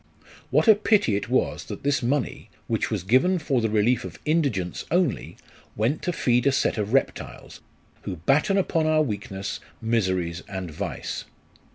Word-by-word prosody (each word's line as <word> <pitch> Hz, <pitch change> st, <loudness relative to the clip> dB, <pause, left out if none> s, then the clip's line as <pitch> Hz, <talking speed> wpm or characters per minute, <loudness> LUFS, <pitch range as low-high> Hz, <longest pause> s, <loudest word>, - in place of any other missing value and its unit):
What -, -, +2 dB
a 220 Hz, -, +10 dB
pity 210 Hz, -, +2 dB
it 100 Hz, -, -3 dB
was 130 Hz, -, 0 dB
that -, -, -8 dB
this 145 Hz, 0 st, +1 dB
money, 130 Hz, +3 st, -1 dB, 0.2 s
which -, -, -1 dB
was -, -, -2 dB
given 130 Hz, -, +3 dB
for 140 Hz, -6 st, 0 dB
the 110 Hz, -, +1 dB
relief 110 Hz, +3 st, +2 dB
of -, -, -8 dB
indigence 140 Hz, -, 0 dB
only, 175 Hz, -5 st, 0 dB, 0.4 s
went 115 Hz, +8 st, 0 dB
to 180 Hz, -, -1 dB
feed 125 Hz, -5 st, +2 dB
a -, -, +5 dB
set 130 Hz, -, +1 dB
of 105 Hz, 0 st, -2 dB
reptiles, 135 Hz, +1 st, -2 dB, 0.4 s
who -, -, -5 dB
batten 140 Hz, -, +2 dB
upon 165 Hz, -4 st, +1 dB
our 155 Hz, 0 st, +4 dB
weakness, 100 Hz, -5 st, -4 dB, 0.2 s
miseries, 95 Hz, -7 st, 0 dB
and 95 Hz, -4 st, -5 dB
vice 75 Hz, -, -5 dB
125 Hz, 165 wpm, -25 LUFS, 100-155 Hz, 0.4 s, a